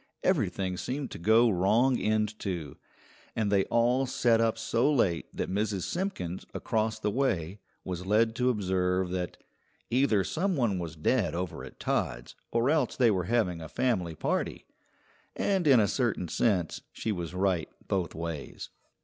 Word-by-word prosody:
Everything 95 - 0
seemed 135 +6 -4
to - - -7
go 110 +7 +5
wrong 110 +6 +3
end 110 0 0
to, 85 -8 -4 0.6
and 105 -3 0
they 100 -1 +3
all 125 +3 +2
sat 115 -2 +3
up 115 -1 +1
so 115 +5 +1
late 95 - +1
that - - -3
Mrs. 100 -1 -1
Simpkins, 170 - -3
across 110 0 -1
the 105 -1 -1
way, 100 -8 -1 0.2
was 90 0 -5
led 110 +2 +3
to 125 0 +2
observe 95 -4 0
that 90 -1 -3 0.5
"Either 120 -6 +3
some 185 - -1
one 115 - +1
was 85 -2 -5
dead 95 +5 +1
over 90 0 -4
at - - -11
Todd's - - -2 0.2
or 120 +4 +2
else 150 -6 +1
they 120 -4 +4
were 90 -3 0
having 90 -6 0
a 80 - -8
family 95 -10 0
party"; - - -2 0.7
and 190 -5 +1
in 135 -4 +7
a 105 - +4
certain 115 -8 0
sense 90 -4 0
she 110 - -3
was 85 -3 -4
right 95 -3 +1 0.2
both 90 -4 -1
ways. 80 -3 -6
105 Hz, 160 wpm, -29 LUFS, 90-120 Hz, 0.7 s, in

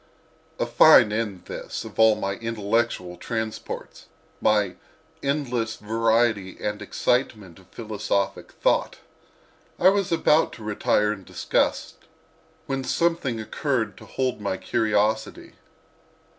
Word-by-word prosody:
A - - 0
fine 105 - +6
end, 105 -5 -3
this, - - -6
of 110 -2 -10
all 110 -1 +6
my 95 -1 -2
intellectual 110 -5 -1
transports—my 110 -2 -3 0.5
"endless 125 -6 -1
variety 110 -2 +1
and 105 0 -3
excitement 105 -8 -1
of 95 - -20
philosophic 105 -3 -3
thought!" - - 0 0.8
I 185 - +6
was 195 -2 0
about 160 -1 +3
to 110 - -11
retire 105 0 +1
in 100 -2 -11
disgust - - -1 0.7
when 135 -1 -2
something 145 -4 0
occurred 120 +1 -2
to - - -12
hold 130 -4 -2
my 100 -2 -2
curiosity. 110 +1 0
110 Hz, 110 wpm, -24 LUFS, 105-120 Hz, 0.8 s, fine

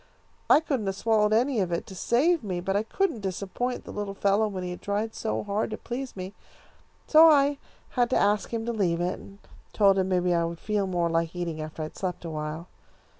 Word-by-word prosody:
I 305 - +7
couldn't 265 -10 -2
have 195 - -1
swallowed 215 0 +2
any 240 +2 +2
of 185 -3 0
it, 170 - -2
to - - -10
save 285 - +2
me, 185 -4 -3
but 195 +2 -2
I 205 - +3
couldn't 235 - -1
disappoint 200 +6 -3
the - - -9
little 205 -1 -4
fellow 200 +2 +2
when 190 -3 -5
he 180 - -4
had 180 - -8
tried 210 +2 -2
so 220 - -2
hard 205 +1 -1
to 215 - -4
please 255 +2 -6
me, 185 +1 -6 0.7
so 320 +1 +8
I 285 -1 +4 0.3
had 245 -2 +1
to - - +2
ask 205 0 +1
him 225 -1 -2
to 235 - -2
leave 180 -6 0
it, 175 +1 -1
and 195 - -13 0.4
told 195 -2 +4
him 190 0 0
maybe 180 -1 +2
I 170 -1 +2
would 170 0 -4
feel 210 -2 -1
more 175 -2 0
like 165 0 -1
eating 170 -3 -3
after 155 +1 -6
I 155 - -6
had - - -16
slept 180 -2 -4
awhile. 155 +1 -5
200 Hz, 225 wpm, -27 LUFS, 180-225 Hz, 0.7 s, so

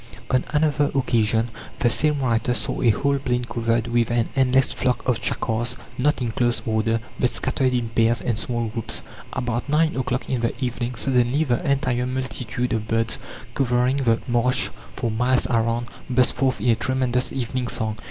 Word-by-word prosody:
On 130 0 +3
another 150 -1 +2
occasion 115 -3 +2 0.3
the 120 - +2
same 150 +2 +2
writer 120 -1 +1
saw - - -2
a 120 - +4
whole 140 +6 +2
plain 125 -2 -1
covered 115 -1 0
with 120 -1 +1
an 120 -1 +1
endless 130 0 +3
flock 125 0 -1
of 125 -2 +1
chakars, 120 0 -1 0.2
not 145 0 +1
in 115 - -1
close 120 +1 0
order, 115 0 +1 0.2
but 125 - +3
scattered 130 +2 0
in 120 -2 -1
pairs 115 +1 +2
and 120 - -1
small 120 +1 -1
groups. 115 0 -4 0.3
About 120 +2 -2
nine 155 +2 +2
o'clock 125 -1 -2
in 130 -3 -1
the 115 - 0
evening, 125 -1 -2
"suddenly 125 +3 +2
the 125 -6 0
entire 125 -3 +1
multitude 125 -1 -3
of 110 -1 -2
birds 115 0 0 0.3
covering 125 0 +2
the 115 -5 +2
marsh 125 +1 +2 0.3
for 115 -3 -1
miles 125 +3 +2
around 115 -1 +1 0.2
burst 125 -1 +3
forth 130 0 0
in 125 - +1
a - - +4
tremendous 125 +1 0
evening 125 -1 -2
song.... 110 -2 -2
125 Hz, 175 wpm, -23 LUFS, 115-130 Hz, 0.3 s, a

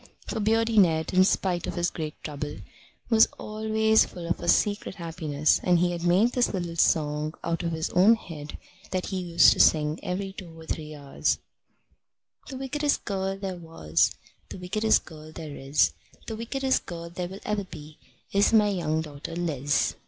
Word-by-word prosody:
For - - -4
Beardy 225 +1 +2
Ned, 160 -4 +2
in 185 0 +6
spite 185 -2 0
of - - -4
his 175 0 0
great 155 -2 -5
trouble, 145 -1 -5 0.6
was 225 -1 +7
always 220 0 +2
full 175 -2 -8
of 170 - -1
a - - -6
secret 205 +2 +1
happiness, 160 -4 0
and 180 -1 +4
he 175 +1 +2
had 170 -1 -4
made 185 +7 +3
this 245 -4 +1
little 175 -2 -4
song 150 -1 +1
out 170 -1 -1
of 170 -1 -2
his 160 0 -3
own 195 +6 +6
head 155 -8 -9 0.3
that 185 -1 -2
he 190 -2 -2
used 170 -1 +5
to - - -8
sing 155 +1 +4
every 190 +1 -4
two 170 -4 -10
or 160 - -11
three 155 -1 -5
hours: 140 -2 -1 1.1
The 265 - -6
wickedest 290 +2 -1
girl 195 -1 -2
there 190 -2 -5
was, 85 - +1 0.4
The - - -8
wickedest 210 +5 +1
girl 155 -1 -12
there 155 -2 -8
is, 135 - +2 0.3
The 225 - -5
wickedest 260 +4 -1
girl 170 -1 -7
there 175 0 -4 0.2
ever 210 - -1
will 200 - -3
be 155 0 -11 0.3
Is 200 +1 +3
my 215 -2 +5
young 160 -5 -1
daughter 150 +2 -8
Liz. 145 -5 0
175 Hz, 180 wpm, -26 LUFS, 155-205 Hz, 1.1 s, was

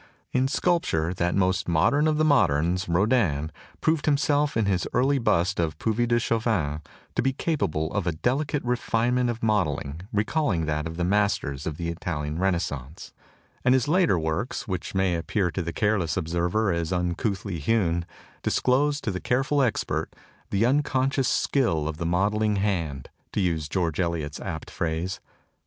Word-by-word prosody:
In 130 +1 +2
sculpture, 135 - +1
that 90 -1 0
most 95 -1 +1
modern 115 - +3
of 155 -1 +2
the 155 - +3
moderns, 90 - +2
Rodin, 85 - +2 0.3
proved 160 -1 +1
himself 145 -1 +2
in 110 - +2
his 95 -3 0
early 135 +3 +3
bust 95 -5 +1
ofTuvis 105 +9 0
de 120 0 +3
Chavannes 110 -11 0 0.3
to - - +1
be 135 +1 +1
capable 80 - -1
of 100 -4 -1
a - - +3
delicate 135 - -1
refinement 120 0 +1
of 115 -1 -4
modelling 105 -9 +2
15 - - -6
THE 70 - -6
TOCSIN 80 +4 -8
OF 95 - -12
REVOLT 105 - -6
recalling 105 - +1
that 75 +1 -1
of 80 0 -7
the 85 - 0
masters 90 -8 0
of 75 -2 -4
the 85 -1 -3
Italian 80 -2 -3
Renas 95 -2 +2
cence; 70 +2 -8 0.5
and 125 +1 +5
his 130 -1 +1
later 170 - +3
works, 80 +7 -2
which 90 -2 -4
may 95 -1 +2
appear 90 +2 0
to 95 - -2
the 85 -1 -3
careless 100 -6 0
observer 85 +6 0
as 85 -2 -1
tmcouthly 90 +1 -2
hewn, 85 -2 +1 0.4
dis - - 0
close 145 +3 +2
to 110 - -2
the 90 - -3
careful 135 +3 +1
expert 125 -4 -1 0.3
"the 100 +3 +2
unconscious 135 0 +1
skill 85 - +1
of 80 -1 -4
the 85 - -2
modelling 105 +4 +1
hand" 85 -10 -2 0.2
to - - 0
use 80 -6 0
George 85 -2 -1
Eliot's 85 -4 -2
apt - - -6
phrase. 85 +3 -2
95 Hz, 175 wpm, -26 LUFS, 85-120 Hz, 0.5 s, and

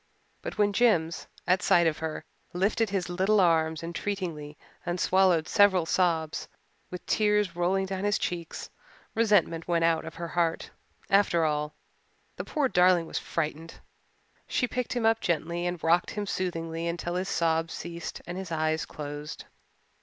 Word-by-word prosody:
But - - -6
when 205 -1 +3
Jims, 175 -8 +2 0.2
at 185 +1 +3
sight 170 -1 +4
of 160 -2 +1
her, 160 0 -4 0.3
lifted 200 +5 +1
his 190 -3 -1
little 190 +4 +2
arms 160 -3 +2
entreatingly 165 -4 -4 0.3
and 175 +1 -2
swallowed 180 -4 +3
several 190 -3 +4
sobs, 165 -3 0 0.4
with 180 - -8
tears 210 -4 +2
rolling 185 +2 +1
down 190 0 -4
his 205 -1 +2
cheeks, 170 -2 -4 0.4
resentment 205 -7 +2
went 170 -1 +2
out 165 -1 +2
of 160 - -8
her 170 0 -5
heart. 170 -1 -1 0.4
After 195 -4 +4
all, 150 0 -1 0.6
the - - -3
poor 295 -4 0
darling 180 -5 +4
was - - -3
frightened. 160 0 -4 0.7
She 250 - 0
picked 250 0 -3
him 240 -3 -1
up 225 0 +4
gently 170 +1 -1
and 175 -2 -4
rocked 170 +2 +3
him 210 -1 -3
soothingly 165 -3 -3
until 175 0 -3
his 185 +2 -2
sobs 165 0 +1
ceased 170 0 -7
and 175 +2 -5
his 190 -3 -7
eyes 155 0 0
closed. 145 0 -7
175 Hz, 155 wpm, -28 LUFS, 165-190 Hz, 0.7 s, sight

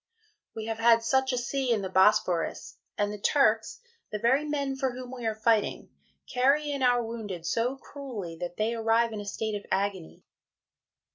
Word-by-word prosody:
We 220 -1 -5
have 225 0 -4
had 230 0 +5
such 265 +3 +2
a 250 - -1
Sea 255 +1 -1
in 215 -4 +1
the - - -2
Bosphorus, 190 -3 +2 0.2
and 205 0 0
the 210 - -7
Turks, 225 - +2 0.3
the 210 - -2
very 260 +7 +2
men 280 -2 -2
for 265 0 0
whom 250 0 -8
we 245 -3 -4
are 220 - -1
fighting, 220 -1 +1 0.4
carry 280 +4 +3
in 280 -1 -3
our 245 -1 +3
Wounded 210 -7 -6
so 235 +8 0
cruelly, 245 -13 -7
that 175 0 -6
they 220 +2 0
arrive 225 0 +2
in 210 - -4
a - - -8
state 215 +2 -3
of 205 -1 -4
Agony. 190 -3 -2
230 Hz, 185 wpm, -28 LUFS, 210-260 Hz, 0.4 s, had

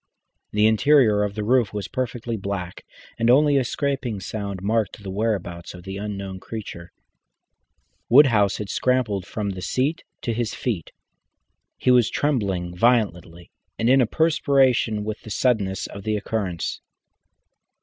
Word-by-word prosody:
The 105 +1 +3
interior 110 -1 +4
of 105 -1 -2
the 105 - -3
roof 120 -1 +2
was 100 -3 -3
perfectly 120 -2 -3
black, 100 -3 -5 0.3
and 115 +1 +2
only 145 +3 +5
a 135 - +3
scraping 135 -4 -2
sound 100 -2 -5
marked 110 0 -1
the 95 - -5
whereabouts 95 -5 -3
of 90 - -11
the 95 +1 -6
unknown 100 -2 -5
creature. 95 -6 -8 1.2
Woodhouse 115 -7 +5
had 105 - -5
scrambled 120 -8 0
from 105 -2 -3
the 95 -1 -7
seat 140 - -1 0.2
to 115 - -1
his 115 -1 -2
feet. 105 -10 -3 0.9
He 125 - +2
was 125 -3 +5
trembling 95 -11 -1
violently 90 -6 0 0.3
and 115 +2 +2
in 135 0 +6
a 120 - +2
perspiration 135 -7 +2
with 110 0 -5
the - - -11
suddenness 105 -5 0
of 100 - -8
the 110 0 0
occurrence. 100 -5 -3
110 Hz, 145 wpm, -23 LUFS, 100-125 Hz, 1.2 s, in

